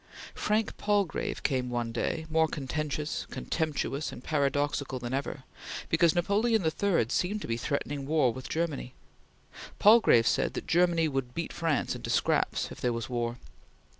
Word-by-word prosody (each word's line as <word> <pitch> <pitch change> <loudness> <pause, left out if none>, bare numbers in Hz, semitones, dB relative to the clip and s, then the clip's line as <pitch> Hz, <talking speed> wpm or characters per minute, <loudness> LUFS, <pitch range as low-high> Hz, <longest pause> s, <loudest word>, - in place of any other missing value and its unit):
Frank 215 +1 0
Palgrave 205 -5 0
came 130 -3 0
one 120 -1 -2
day, 160 +7 -2
more 160 0 +3
contentious, 150 +1 -3
contemptuous, 155 -2 -2
and 125 - -10
paradoxical 145 -2 0
than 120 0 -5
ever, 135 0 -3 0.5
because 165 -1 +4
Napoleon 205 +3 +2
III 170 - +2
seemed 200 +10 0
to - - -5
be 115 - 0
threatening 140 +2 -3
war 145 -6 +3
with 130 +1 -8
Germany. 155 -6 -2 0.8
Palgrave 210 - +6
said - - +1
that - - -4
"Germany 170 -1 +3
would 135 -4 -3
beat 170 -1 -3
France 165 -3 0
into - - -6
scraps" - - +1
if - - -10
there 125 - +1
was 115 +2 -4
war. 120 0 -1
150 Hz, 150 wpm, -29 LUFS, 130-170 Hz, 0.8 s, Palgrave